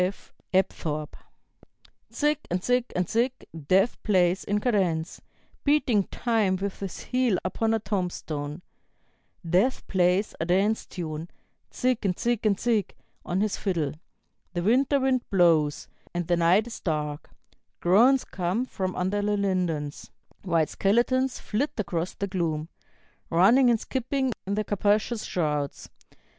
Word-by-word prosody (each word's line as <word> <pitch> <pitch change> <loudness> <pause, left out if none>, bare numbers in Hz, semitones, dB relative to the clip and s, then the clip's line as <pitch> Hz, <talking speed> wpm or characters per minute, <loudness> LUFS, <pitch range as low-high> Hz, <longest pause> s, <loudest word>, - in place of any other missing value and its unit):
F. 190 +2 -4 0.2
Apthorp): 155 -5 -1 1.0
"Zig 300 0 +1
and 180 +1 -1
Zig 250 -1 +2
and 180 -1 0
Zig, 240 +3 +1 0.3
Death 195 +7 +3
plays 185 -3 +2
in 205 +1 0
cadence, 185 -8 0 0.4
Beating 260 -9 +3
time 220 -6 0
with 195 +1 -4
his 195 -3 -6
heel 250 -6 +1
upon 225 +4 0
a - - +2
tombstone; 180 -6 -4 0.8
Death 190 +10 +2
plays 185 +2 +2
a 160 - -1
dance 195 +5 +1
tune, 160 -2 -5 0.4
Zig 250 -2 0
and 185 -3 0
Zig 240 -2 0
and 200 -2 +1
Zig, 225 -5 0 0.3
on 180 +2 -1
his 210 -1 0
fiddle. 170 -8 -1 0.6
The 175 -1 -2
winter 260 +7 +3
wind 260 -2 0
blows, 165 -6 +3 0.3
and 175 -1 -2
the 175 - +3
night 175 +6 +4
is 240 - -8
dark; 150 -3 -3 0.5
Groans 240 +10 +4
come 190 +7 -1
from 185 -6 -3
under 190 +3 0
the 205 0 0
lindens; 175 -7 -2 0.3
White 165 -5 +1
skeletons 245 +5 +1
flit 255 +8 -2
across 180 -4 -2
the 200 - -2
gloom, 165 -5 -2 0.6
Running 225 +10 +5
and 230 -2 +3
skipping 260 +1 -1
in 200 - 0
their 215 - 0
capacious 210 +3 0
shrouds. 150 -4 -2
195 Hz, 135 wpm, -26 LUFS, 175-230 Hz, 1.0 s, Running